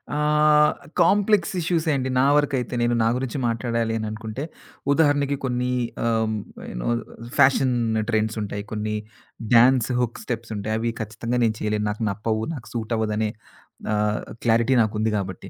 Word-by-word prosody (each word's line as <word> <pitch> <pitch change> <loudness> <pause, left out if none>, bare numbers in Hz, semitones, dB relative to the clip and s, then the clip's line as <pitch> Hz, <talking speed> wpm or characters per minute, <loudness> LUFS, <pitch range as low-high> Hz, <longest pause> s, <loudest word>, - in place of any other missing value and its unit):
ఆహ్, 150 0 +4 0.3
కాంప్లెక్స్ 200 0 +3
ఇష్యూసే 165 -1 0
అండి. 130 0 -2
నా 130 - +4
వరకైతే 135 -4 0
నేను 120 0 +2
నా - - +3
గురించి 130 +1 -3
మాట్లాడాలి 115 -1 -1
అననుకుంటే 110 +4 -5 0.5
ఉదాహరణకి 145 -2 +3
కొన్ని 125 0 -1 0.3
ఆహ్, 110 -1 +1 0.4
ఏనో - - -3 0.5
ఫ్యాషన్ 130 -1 +4 0.3
ట్రెండ్స్ 110 0 0
ఉంటాయి. 100 0 -4
కొన్ని 105 0 -2 0.6
డాన్స్ 125 +1 +5
హుక్ 120 -1 -2
స్టెప్స్ 115 -1 -5
ఉంటాయి. 105 +2 -3
అవి 115 0 -1
ఖచ్చితంగా 115 +3 -3
నేను 110 -1 +2
చేయలేను. 105 0 -1
నాకు 105 +2 -3
నప్పవు. 110 +2 -2
నాకు 125 -7 -9
సూట్ 115 0 -3
అవ్వదనే 110 0 0 0.6
ఆహ్, 105 0 0 0.2
క్లారిటీ 115 +3 +3
నాకుంది 110 0 0
కాబట్టి. 95 -1 -5
115 Hz, 140 wpm, -23 LUFS, 110-135 Hz, 0.6 s, డాన్స్